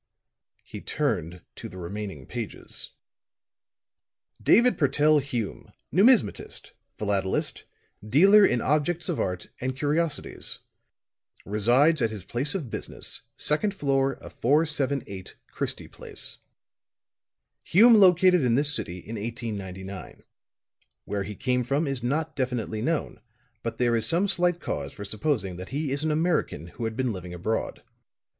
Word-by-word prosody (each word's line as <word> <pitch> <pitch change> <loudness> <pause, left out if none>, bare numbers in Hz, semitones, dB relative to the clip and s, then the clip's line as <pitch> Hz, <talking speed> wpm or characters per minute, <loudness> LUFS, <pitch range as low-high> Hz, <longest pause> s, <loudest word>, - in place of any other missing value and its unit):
He - - -9
turned 85 +2 -2
to - - -8
the 95 - -11
remaining 95 -5 -6
pages. - - -5 1.5
"David 245 +2 +5
Purtell 150 +1 +3
Hume, 120 -6 -5 0.2
Numismatist, 220 +5 +3 0.3
philatelist, 100 -2 -1 0.4
dealer 190 - +6
in 125 -11 +3
objects 155 +5 0
of 175 - -1
art 90 -1 -2
and 130 +1 -2
curiosities. 150 +3 +1 0.9
Resides 125 +10 +3
at 115 - +2
his 105 -4 -7
place 135 - -1
of 145 - -4
business, - - -3
second 195 +7 +1
floor 135 -4 +1
of - - -12
478 140 - 0 0.2
Christie - - -3
Place. - - -4 1.2
"Hume 230 +7 +6
located 185 -3 +6
in 120 -3 +2
this 145 +2 +2
city 90 -9 -4
in 110 +5 -7
1899. 100 -4 -6 0.8
Where 100 0 -2
he 100 +2 -5
came 125 +1 0
from 140 +6 0
is 135 -3 0
not 155 +6 -1
definitely 125 -4 -2
known, 160 +5 -2 0.4
but 115 -1 -4
there 120 -1 +2
is 115 - +2
some 175 +4 +3
slight 180 -2 +1
cause - - -4
for 100 -6 -7
supposing 100 - -1
that 90 +1 -8
he 145 0 -2
is 140 +2 -1
an 160 - +1
American 155 - 0
who 115 - -6
had 110 0 -4
been 130 -3 0
living 90 -2 -7
abroad. 110 +6 -3
130 Hz, 135 wpm, -26 LUFS, 105-155 Hz, 1.5 s, dealer